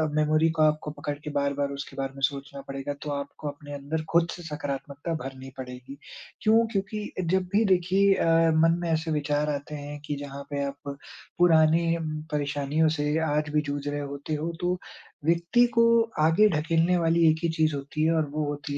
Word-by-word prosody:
Memory 155 +1 +3
को - - +3
आपको 155 0 +2
पकड़ 145 0 -4
के - - -5
बार-बार 140 0 0
उसके 140 -1 -7
बारे 135 0 -3
में 135 - -10
सोचना 140 0 -9
पड़ेगा 135 +1 -4
तो 150 - -5
आपको 140 +1 -5
अपने 145 0 -9
अंदर 145 +3 -3
ख़ुद 170 0 +4
से 175 - -8
सकारात्मकता 145 0 -4
भरनी 135 0 -8
पड़ेगी। 130 +1 -8 0.4
क्यों? 225 +1 +4
क्योंकि 205 +1 -3 0.2
जब 190 0 +3
भी 215 +3 +4
देखिए 190 +1 +3
अ, - - 0 0.3
मन 165 +1 +4
में 170 - -2
ऐसे 160 0 0
विचार 150 0 0
आते 145 +1 -4
हैं 145 0 -7
कि 145 - -2
जहाँ 140 0 -8
पे 140 -1 -2
आप 140 0 -6 0.4
पुरानी 165 0 +4
म 155 -1 -4
परेशानियों 145 +1 +1
से 150 +1 0 0.3
आज 150 - -9
भी 150 - +3
जूझ 145 -1 -4
रहे 145 0 -2
होते 140 +2 -5
हो 160 +3 -2
तो 180 +1 0 0.5
व्यक्ति 170 +9 +3
को 230 - +6 0.4
आगे 165 +7 +5
ढकेलने 165 +3 +2
वाली 165 0 +3
एक 160 0 +1
ही 170 - +2
चीज़ 155 -2 +2
होती 140 +2 -3
है 165 - +3
और 160 -1 +2
वो 155 0 -1
होती 145 0 -4
150 Hz, 190 wpm, -27 LUFS, 140-165 Hz, 0.5 s, को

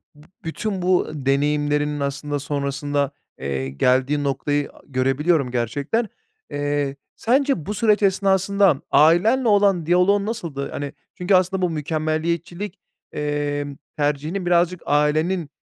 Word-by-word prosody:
B 150 +1 -18 0.2
bütün 190 +4 -3
bu 180 0 +2
deneyimlerinin, 145 +1 0
aslında, 140 +1 -2
sonrasında, 140 0 -2 0.3
eee, 65 -1 -3
geldiği 130 - +1
noktayı 145 +1 -1 0.2
görebiliyorum 135 +2 +1
gerçekten. 140 - -1 0.4
Eee, 145 -1 -1 0.2
sence 265 - +1
bu 210 - -3
süreç 215 -1 +2
esnasından 195 -3 +3
ailenle 200 - +4
olan 200 -5 +3
diyaloğun 180 +4 +3
nasıldı? 170 -12 -4
Hani, 145 -1 -5 0.2
çünkü, 185 +2 +2
aslında, 185 +1 +2
bu 180 - +2
mükemmeliyetçilik, 165 +5 -2 0.3
emm, 145 -1 -2 0.2
tercihinin 150 +5 -1
birazcık 175 0 +2
ailenin 155 +3 +1
150 Hz, 110 wpm, -22 LUFS, 145-185 Hz, 0.4 s, ailenle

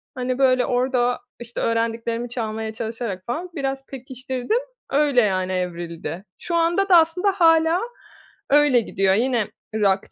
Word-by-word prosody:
hani, 255 0 -2
böyle, 255 -2 +4
orada, 245 0 +1 0.2
işte, 235 0 -6
öğrendiklerimi 230 +1 -1
çalmaya 220 -2 -4
çalışarak 225 -4 -5
falan 335 +9 -4
biraz 270 -1 -3
pekiştirdim. 260 - -3 0.3
Öyle, 280 -3 +3
yani, 185 -3 0
evrildi. 175 0 -4
Şu 340 - -3
anda 345 +4 +2
da 350 - +8
aslında 345 +5 +3
hâlâ 330 -1 +4 0.7
öyle 285 -4 +5
gidiyor. 195 -2 +1
Yine 235 -2 +1 0.3
rock 195 -2 +1
245 Hz, 130 wpm, -22 LUFS, 220-290 Hz, 0.7 s, da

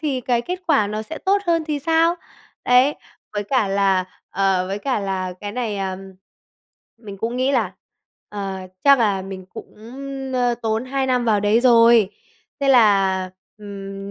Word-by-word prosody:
thì 280 -5 -1
cái 240 -1 0
kết 360 +4 -5
quả 275 -10 +3
nó 215 +1 -4
sẽ 315 +8 -8
tốt 390 +1 +2
hơn 330 -2 +1
thì 300 -2 -2
sao?" 330 +3 +2 0.5
Đấy, 250 +4 +4 0.4
với 205 -1 -2
cả 220 -3 +1
là 195 -2 +2 0.3
ờ, 190 -2 +1
với 195 +2 -3
cả 255 -2 -1
là 190 -2 -3
cái 205 0 -5
này, 230 -4 -3
à, 195 -1 -2
ờm, 190 +1 -9 0.9
mình 200 -4 -10
cũng 235 +3 -3
nghĩ 260 +2 +1
là 215 -8 0 0.6
"Ờ, 195 -2 -5 0.3
chắc 280 -2 +7
là 200 -4 +1
mình 190 -1 -8
cũng, - - -12 0.6
ơ, 245 -1 +1
tốn 220 +2 -1
2 265 0 -2
năm 250 -2 +1
vào 210 -3 +2
đấy 210 +3 +3
rồi." 230 -4 +5 0.5
Thế 275 - +1
là, 195 -6 +4 0.3
ừm, 195 -1 -8
220 Hz, 175 wpm, -21 LUFS, 195-255 Hz, 0.9 s, chắc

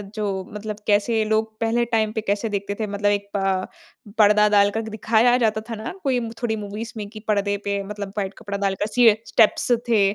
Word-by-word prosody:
जो 215 -1 -2 0.3
मतलब 210 0 -5
कैसे 215 +2 +2
लोग 220 +1 0
पहले 230 +1 +1
टाइम 220 -2 0
पे 220 - -2
कैसे 205 +1 -1
देखते 200 0 -3
थे 215 - -1
मतलब 205 0 0
एक 200 0 -1
प 195 -1 0 0.5
पर्दा 210 0 +6
डालकर 205 +1 +3
दिखाया 220 +3 +3
जाता 220 -3 +1
था 225 - -3
ना 220 +1 -6
कोई 265 -4 +1 0.2
थोड़ी 230 -2 0
मूवीज़ 210 +2 -6
में 210 -1 -5
कि 215 0 -10
पर्दे 205 -1 +1
पे 200 0 -1
मतलब 200 0 -6
व्हाइट 195 -1 -2
कपड़ा 205 -2 -5
डालकर 200 0 -1
सीए 225 -1 +5
स्टेप्स 225 +2 +3 0.2
थे 225 -3 +4
210 Hz, 195 wpm, -22 LUFS, 200-220 Hz, 0.5 s, पर्दा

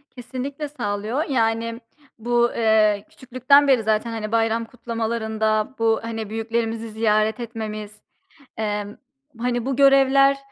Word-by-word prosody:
Kesinlikle 270 +4 -5
sağlıyor. 220 0 -3
Yani, 230 -2 0 0.4
bu, 240 +1 +1
eee, 215 -2 +2
küçüklükten 260 +3 +3
beri 260 -5 +4
zaten, 220 +2 0
hani, 215 -2 -5
bayram 225 0 +1
kutlamalarında 220 -1 -2
bu, 225 -1 +2
hani, 225 -2 -5
büyüklerimizi 225 0 -3
ziyaret 215 +1 +1
etmemiz, 215 -3 -6 0.6
emm, 210 -1 -3 0.4
hani, 245 0 -1
bu 270 0 -1
görevler 275 0 +5
225 Hz, 115 wpm, -22 LUFS, 220-250 Hz, 0.6 s, görevler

